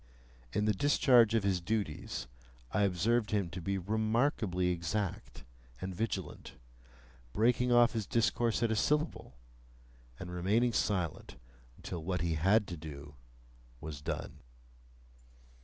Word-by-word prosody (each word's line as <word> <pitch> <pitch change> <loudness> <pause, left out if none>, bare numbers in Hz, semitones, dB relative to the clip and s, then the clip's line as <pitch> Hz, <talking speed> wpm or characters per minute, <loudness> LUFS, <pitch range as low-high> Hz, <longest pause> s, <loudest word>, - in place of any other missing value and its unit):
In 105 - 0
the 110 - +3
discharge 120 -1 +4
of 110 - +2
his 95 -3 +1
duties, 100 -5 -3 0.5
I 105 - +1
observed 105 +4 +1
him 100 -5 -1
to 90 - -6
be 95 +3 -1
remarkably 110 -2 0
exact 90 +3 -3 0.4
and 95 +5 -5
vigilant, 110 +5 -4 0.8
breaking 120 +3 +2
off 120 0 +6
his 110 -5 -3
discourse 115 0 +1
at 115 - +2
a - - +1
syllable, 150 - 0 0.8
and 90 -1 -7
remaining 105 +7 +1
silent 90 -10 -1 0.4
until 85 -3 -6
what 90 0 -2
he 85 -1 0
had 95 +8 +3
to 85 - -5
do 75 -2 -9 0.7
was 75 -1 -7
done. - - -5
100 Hz, 125 wpm, -32 LUFS, 90-115 Hz, 0.8 s, off